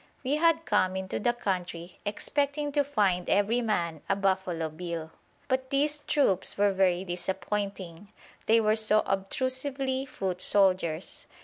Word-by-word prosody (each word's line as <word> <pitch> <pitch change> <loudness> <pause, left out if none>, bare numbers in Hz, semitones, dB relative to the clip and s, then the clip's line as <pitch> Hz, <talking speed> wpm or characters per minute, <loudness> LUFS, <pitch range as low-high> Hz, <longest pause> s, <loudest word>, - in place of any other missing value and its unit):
We 275 +3 0
had 330 0 +2
come 185 -3 +1
into 190 0 -3
the 240 - +2
country 180 -6 -4
expecting 285 +7 -1
to 290 0 +2
find 200 -10 0
every 210 +5 +2
man 170 -9 -1
a 195 - +3
Buffalo 190 -4 -1
Bill; 165 0 -6 0.4
but 260 0 -1
these 295 +2 +1
troops 285 -10 +2
were 205 0 +3
very 185 -1 +2
disappointing; 190 +1 -4 0.4
they 225 +1 +5
were 215 -1 +2
so 215 -1 +4
obtrusively 260 +6 0
foot 185 -6 -4
soldiers. 185 -4 +1
200 Hz, 135 wpm, -28 LUFS, 180-260 Hz, 0.4 s, they